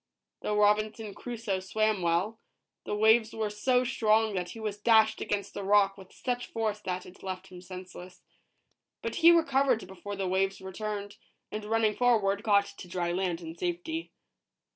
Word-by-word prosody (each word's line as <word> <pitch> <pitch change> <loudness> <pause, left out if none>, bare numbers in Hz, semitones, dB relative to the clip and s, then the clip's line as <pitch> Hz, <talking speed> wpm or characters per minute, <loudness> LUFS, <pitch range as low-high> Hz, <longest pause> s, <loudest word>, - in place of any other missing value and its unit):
Though 210 - -1
Robinson 210 0 +2
Crusoe 230 -5 -3
swam 215 +1 0
well, 175 +7 0 0.5
the - - -2
waves 220 +1 +4
were 215 -2 -1
so 250 +4 +2
strong 220 -3 +2
that 180 -2 -2
he 225 - -9
was 210 -2 -4
dashed 220 -1 +4
against 205 -1 -3
a - - -3
rock 195 0 +4
with 190 -2 -14
such 245 -1 -3
force 215 -2 -2
that 185 -3 -4
it 180 - -14
left 190 0 -6
him 180 -1 -11
senseless. 180 0 -10 0.8
But - - -3
he 335 - +7
recovered 275 - +3
before 190 +2 -7
the 195 -1 -2
waves 190 +1 0
returned, 205 +1 -5 0.3
and 215 0 -5
running 220 -1 +2
forward, 210 -5 +2
got 205 -2 +4
to 180 - -9
dry 175 -1 -2
land 180 -1 -1
in 165 -1 -7
safety. 175 - -3
205 Hz, 165 wpm, -29 LUFS, 190-220 Hz, 0.8 s, he